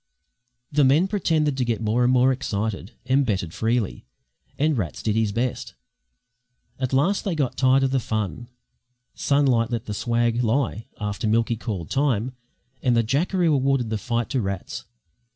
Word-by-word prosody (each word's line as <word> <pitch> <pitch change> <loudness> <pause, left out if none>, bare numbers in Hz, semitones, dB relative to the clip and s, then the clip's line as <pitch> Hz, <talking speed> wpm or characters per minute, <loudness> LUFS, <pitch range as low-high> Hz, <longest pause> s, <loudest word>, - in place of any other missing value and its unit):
The 145 0 +3
men 145 +8 +4
pretended 160 -8 +1
to 130 - +1
get 115 -2 -1
more 115 +2 +1
and 125 - +4
more 130 +1 +4
excited, 110 -4 -3
and 130 +2 +3
betted 95 -9 -2
freely; 115 -2 -1 0.5
and 155 +1 +2
Rats 95 -10 -3
did 110 -1 0
his 110 -2 +1
best. 120 +4 -3 1.0
At 130 -2 -1
last 150 +10 +2
they 190 -4 -1
got 140 -5 -1
tired 130 +1 +4
of 135 - +1
the 135 - +2
fun, 110 -2 -3 0.7
Sunlight 130 -5 +2
let 115 -3 -3
the 105 - -4
swag 120 +2 0
lie 115 -1 0
after 105 +2 -2
Milky 115 +2 +2
called 105 -7 -5
time, 130 -4 +1 0.5
and 125 -2 +2
the 115 - +4
jackaroo 165 - +1
awarded 135 -4 +1
the 110 - -1
fight 120 -2 -2
to 130 -3 +1
Rats. 95 -2 -4
120 Hz, 165 wpm, -24 LUFS, 110-135 Hz, 1.0 s, men